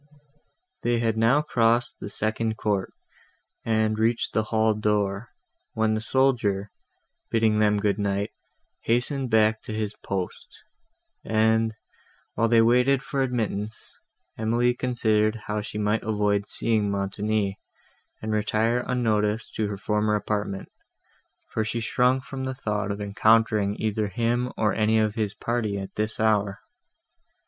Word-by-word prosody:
They 120 0 +1
had 115 -1 0
now 115 +7 +3
crossed 120 -3 +1
the - - -6
second 110 +1 -1
court, 100 -3 -1 0.7
and 110 -1 +1
reached 115 +1 +1
the 110 - +1
hall 110 0 +2
door, 105 0 -1 0.4
when 110 0 +1
the 110 - -1
soldier, 115 -6 +1 0.6
bidding 110 -2 +2
them 105 -1 +3
good 100 -1 0
night, 100 +1 -1 0.5
hastened 125 +3 0
back 110 0 +3
to 110 - -7
his 105 -1 -2
post; 95 -2 -4 0.8
and, 110 0 +2 0.6
while 115 - +2
they 115 0 +5
waited 125 +4 +3
for 135 0 -2
admittance, 110 -4 -3 0.4
Emily 120 +2 +2
considered 110 -4 +1
how 105 0 -2
she 105 - -6
might 105 +1 +1
avoid 105 -2 0
seeing 110 -3 +1
Montoni, 100 +1 -1 0.6
and 110 - -2
retire 110 +3 +1
unnoticed 110 -3 0
to 110 - 0
her 100 -1 -4
former 105 +1 0
apartment, 105 -2 -3 0.8
for 110 - 0
she 115 +2 -2
shrunk 125 +3 +2
from 135 0 -6
the 130 0 -3
thought 105 -4 -2
of 100 0 -3
encountering 105 0 +2
either 110 -1 0
him, 120 +3 0
or 105 -3 +2
any 110 0 +2
of 110 -1 +2
his 105 -3 -2
party, 115 -3 -2
at 95 -1 -6
this 105 +1 -2
hour. 105 -3 +1
110 Hz, 140 wpm, -25 LUFS, 105-115 Hz, 0.8 s, they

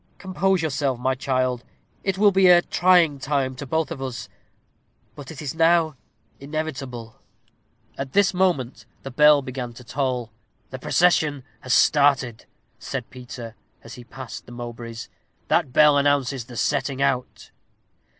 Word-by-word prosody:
Compose 190 -1 0
yourself, 140 -4 -1
my 130 +2 0
child. 130 -2 -1 0.4
It 195 -1 -1
will 205 0 +5
be 190 -1 +4
a 175 -1 +7
trying 175 -6 +3
time 135 -1 -1
to 140 - -7
both 160 +3 -1
of 145 -5 -6
us; 130 -2 -6 0.8
but 145 -2 -11
it 155 -1 -8
is 140 - -4
now 165 -1 +3 0.4
inevitable." 135 -6 -6 0.8
At 135 -1 -5
this 200 -2 +3
moment 135 - -1 0.2
the 135 - -7
bell 150 +2 +5
began 125 -2 -6
to 125 - -13
toll. 125 -2 -3 0.4
"The 130 - -7
procession 155 -3 +2 0.2
has 130 0 0
started," 140 -5 +2 0.3
said - - -6
Peter, 120 -2 -9 0.3
as - - -11
he 125 - -10
passed 125 -2 -10
the - - -12
Mowbrays. 120 -1 -8 0.4
"That 130 - +2
bell 150 +1 +5
announces 140 -3 0
the 120 -1 -11
setting 135 +3 -1
out." 130 -2 -2
135 Hz, 145 wpm, -23 LUFS, 125-155 Hz, 0.8 s, a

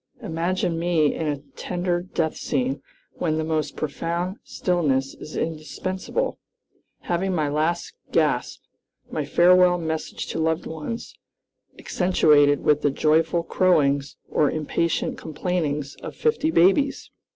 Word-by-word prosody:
imagine 165 +1 -1
me 165 -4 +2
in 160 - -3
a 145 -1 0 0.2
tender 175 -1 -1
death 165 -3 -2
scene, 135 0 -1 0.4
when 155 -3 0
the 160 - 0
most 155 -2 -1
profound 170 +5 -3
stillness 140 -7 0
is 155 - -9
indispensable, 185 - -3 0.6
having 185 +2 -1
my 155 -3 +1
last 155 +4 -1 0.2
gasp, - - 0 0.5
my 155 - -1
farewell 180 +4 +5
message 160 -2 -3
to - - -4
loved 160 +1 0
ones, 160 +9 -6 0.6
accentuated 150 -6 +3
with 150 0 +3
the 145 - +3
joyful 160 +4 +2
crowings 145 -6 +2
or 150 - +2
impatient 160 +1 -1
complainings 150 -3 -2
of - - -7
fifty 450 -9 +1
babies." 275 - +3
160 Hz, 120 wpm, -24 LUFS, 150-180 Hz, 0.6 s, farewell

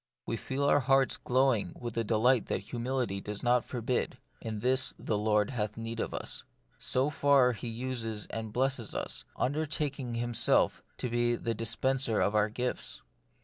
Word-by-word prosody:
We 115 - -1
feel 135 +5 -3
our 145 +1 +5
hearts 135 0 +3
glowing 125 -7 +1
with 120 -2 -5
a 115 - +1
delight 115 +2 +3
that - - -1
humility 120 -2 -2
does 105 0 -3
not 120 0 +3
forbid, 125 0 -2
" - - -38
in 110 -2 -4
this 130 +2 +2
the 110 - -2
Lord 105 +1 +2
hath 105 -4 -2
need 115 0 -5
of - - -2
us." - - -5 0.4
So 135 +4 +1
far, 140 -3 +4
He 120 +1 -5
uses 115 -2 -3
and 110 -1 -4
blesses 130 -2 0
us, - - -2
undertaking 140 -3 -1
Himself 120 -1 +2 0.2
to - - -2
be 120 0 +2
the 115 0 -2
dispenser 115 +1 0
of 105 - +2
our 105 0 +3
gifts. 125 +3 -3
120 Hz, 170 wpm, -31 LUFS, 110-130 Hz, 0.4 s, our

